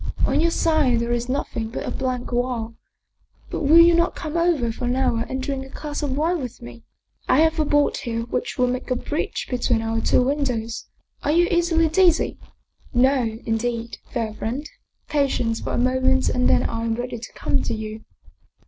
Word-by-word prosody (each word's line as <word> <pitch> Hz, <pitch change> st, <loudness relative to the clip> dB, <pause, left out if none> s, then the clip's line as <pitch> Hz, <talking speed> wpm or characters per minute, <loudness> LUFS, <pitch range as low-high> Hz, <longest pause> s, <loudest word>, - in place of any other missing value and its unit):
On -, -, +2 dB
your 335 Hz, -, +3 dB
side 310 Hz, -8 st, +2 dB
there 235 Hz, +1 st, -2 dB
is 240 Hz, +1 st, -1 dB
nothing 235 Hz, -4 st, -2 dB
but 230 Hz, -, -5 dB
a -, -, -3 dB
blank 255 Hz, -2 st, -3 dB
wall. 240 Hz, -2 st, -1 dB, 0.8 s
But -, -, -3 dB
will 310 Hz, +2 st, +5 dB
you 340 Hz, 0 st, +8 dB
not 340 Hz, +2 st, +2 dB
come 310 Hz, -2 st, -5 dB
over 335 Hz, -9 st, +2 dB
for 245 Hz, -, -5 dB
an 245 Hz, +1 st, +1 dB
hour 240 Hz, -3 st, 0 dB
and 260 Hz, 0 st, -3 dB
drink 270 Hz, -1 st, -3 dB
a 270 Hz, -, -11 dB
glass 295 Hz, +1 st, -5 dB
of 275 Hz, -2 st, -2 dB
wine 330 Hz, +2 st, +1 dB
with 250 Hz, -3 st, -6 dB
me? 120 Hz, -1 st, -11 dB, 0.5 s
I 275 Hz, -, +5 dB
have 320 Hz, 0 st, +2 dB
a 305 Hz, -, +3 dB
board 290 Hz, 0 st, +2 dB
here 230 Hz, -3 st, -3 dB
which 245 Hz, +1 st, -3 dB
will 250 Hz, -, +3 dB
make 250 Hz, +1 st, -3 dB
a 255 Hz, -, +1 dB
bridge 295 Hz, +5 st, -3 dB
between 245 Hz, -2 st, 0 dB
our 225 Hz, 0 st, -1 dB
two 250 Hz, -, +3 dB
windows. 250 Hz, -5 st, -2 dB, 0.4 s
Are -, -, -2 dB
you 345 Hz, +3 st, +4 dB
easily 340 Hz, -1 st, +3 dB
dizzy?" 345 Hz, +1 st, +3 dB, 0.3 s
" -, -, -31 dB
No, 250 Hz, -5 st, +1 dB
indeed, 230 Hz, +1 st, -2 dB
fair 225 Hz, -3 st, -2 dB
friend. 245 Hz, +7 st, -4 dB, 0.4 s
Patience 260 Hz, -6 st, 0 dB
for -, -, -4 dB
a -, -, 0 dB
moment 260 Hz, +1 st, +2 dB
and 250 Hz, 0 st, +1 dB
then -, -, +4 dB
I 230 Hz, 0 st, -2 dB
am 225 Hz, -1 st, 0 dB
ready 245 Hz, 0 st, -4 dB
to 230 Hz, -, -10 dB
come -, -, 0 dB
to 230 Hz, -, -2 dB
you." 220 Hz, 0 st, -6 dB
255 Hz, 200 wpm, -23 LUFS, 230-295 Hz, 0.8 s, you